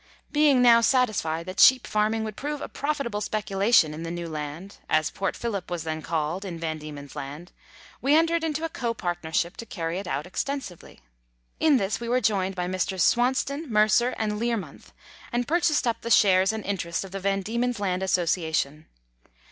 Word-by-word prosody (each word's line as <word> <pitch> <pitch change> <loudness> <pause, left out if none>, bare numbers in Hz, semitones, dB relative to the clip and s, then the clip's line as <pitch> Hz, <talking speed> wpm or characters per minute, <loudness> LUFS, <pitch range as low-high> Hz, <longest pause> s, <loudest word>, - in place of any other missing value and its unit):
Being 295 -4 +4
now 235 -1 +7
satisfied 215 -10 +1
that 185 +2 -6
sheep 260 -1 +7
farming 215 +1 0
would 215 -2 -5
prove 295 +3 -4
a - - -5
profitable 280 -8 -3
speculation 200 -5 +2
in 155 - -7
the 165 - -4
New 170 0 -4
Land, 155 +5 -6
as 155 0 +2
Port 195 - -2
Phillip 205 -6 -4
was 175 -3 -3
then 160 -1 -4
called 165 +4 -2
in 180 -4 -6
Van 160 -1 -3
Diemen's 145 -2 -9
Land, 145 +6 -7 0.5
we 280 +3 +3
entered 330 +1 +3
into 315 0 -1
a - - -3
copartnership 175 - -2
to - - -6
carry 170 -2 -3
it 195 - -7
out 145 -2 -2
extensively. 195 - -5 0.6
In 305 -4 +4
this 200 -2 -1
we 235 0 -5
were 250 +1 +3
joined 195 -4 0
by 180 -1 -2
Messrs. 185 0 -1
Swauston, 265 +5 +1
Mercer, 215 +3 +3
and 210 -1 -2
Learmonth, 230 -4 -3 0.4
and 240 0 -1
pur 340 +3 +2
chased 310 -5 +2
up 230 -1 -1
the 235 - -5
shares 190 -3 +5
and 220 -1 -5
interest 170 -4 -2
of 190 - -11
the 195 - -4
Van 195 +1 0
Diemen's 235 +2 -1
Land 185 -2 -1
Association. 160 -5 0
200 Hz, 185 wpm, -26 LUFS, 170-240 Hz, 0.6 s, now